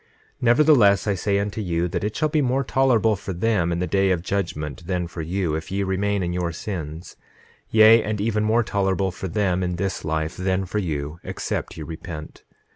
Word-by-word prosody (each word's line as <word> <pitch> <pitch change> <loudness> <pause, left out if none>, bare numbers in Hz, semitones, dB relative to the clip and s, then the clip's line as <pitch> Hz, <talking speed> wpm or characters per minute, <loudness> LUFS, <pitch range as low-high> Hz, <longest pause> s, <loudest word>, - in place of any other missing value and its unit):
9:15 - - -35
Nevertheless 120 -5 +5
I 105 - +1
say 100 +2 0
unto 100 +2 -2
you, 85 -3 0
that 85 - -3
it 105 +1 -2
shall 155 - +1
be 150 0 +1
more 130 +1 +1
tolerable 120 -5 +2
for 95 0 -6
them 90 -2 +1
in 85 - -1
the 90 - 0
day 95 +1 +2
of 90 -3 0
judgment 85 -4 -3
than 90 -2 -1
for 85 0 -6
you, 85 0 -1
if 80 +3 -4
ye 100 +1 0
remain 100 +1 0
in 85 0 -2
your 90 -1 -1
sins, 85 -2 -6 0.5
yea, 110 +1 +7
and 105 -1 -3
even 105 0 0
more 110 +2 +3
tolerable 95 -2 0
for 95 - -6
them 95 0 0
in 90 -1 -1
this 95 +2 -3
life 80 +1 -2
than 95 +1 0
for 100 +4 -2
you, 75 -3 -3
except - - -4
ye 80 - -5
repent. 80 0 -8
95 Hz, 205 wpm, -23 LUFS, 85-105 Hz, 0.5 s, yea